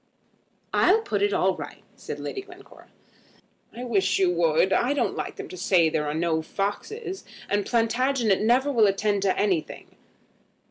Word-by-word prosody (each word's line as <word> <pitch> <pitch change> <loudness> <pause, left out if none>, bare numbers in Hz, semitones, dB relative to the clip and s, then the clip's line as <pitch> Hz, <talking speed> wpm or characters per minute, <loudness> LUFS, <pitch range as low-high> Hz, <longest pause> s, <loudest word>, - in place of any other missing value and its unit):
"I'll 410 +5 +4
put 430 - -2
it 410 0 +2
all - - +2
right," - - -9
said - - -7
Lady 395 - -5
Glencora. 390 0 -16 0.8
"I 245 - -8
wish 200 -6 +1
you 185 -2 +3
would. 170 +2 +2
I 245 +8 +2
don't - - 0
like - - -5
them 405 -1 -7
to 370 - -9
say 170 - +3
there 150 -1 -1
are 150 - -2
no 160 -1 0
foxes; 375 - -4 0.2
and 205 0 -1
Plantagenet 235 -2 +1
never 250 +6 +2
will 225 -5 +4
attend 200 +1 0
to 190 -1 +1
anything." 190 -6 -2
215 Hz, 165 wpm, -25 LUFS, 190-285 Hz, 0.8 s, I'll